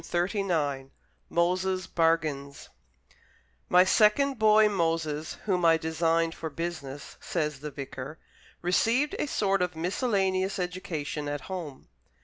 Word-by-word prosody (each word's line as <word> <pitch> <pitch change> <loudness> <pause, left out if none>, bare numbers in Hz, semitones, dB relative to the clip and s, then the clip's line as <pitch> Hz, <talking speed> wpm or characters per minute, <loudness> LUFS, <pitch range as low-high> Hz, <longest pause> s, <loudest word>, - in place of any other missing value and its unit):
Shakespeare 175 -7 -1 0.5
MOSES' 185 +2 +1
BARGAINS 155 -4 0 1.0
"My 180 0 +7
second 225 +7 +3
boy, 215 0 +6
Moses, 165 -5 -1
whom 185 -4 +1
I 165 -1 +6
designed 165 +1 0
for 160 - -5
business," 145 -3 -6
says 150 -5 -2
the 150 +2 -5
vicar, 135 +1 -7 0.5
"received 230 +11 +2
a - - 0
sort 195 -7 +1
of 180 -2 -1
miscellaneous 190 +1 0
education 165 -5 -4
at 145 -1 -3
home." 170 -8 -7
170 Hz, 115 wpm, -28 LUFS, 155-190 Hz, 1.0 s, My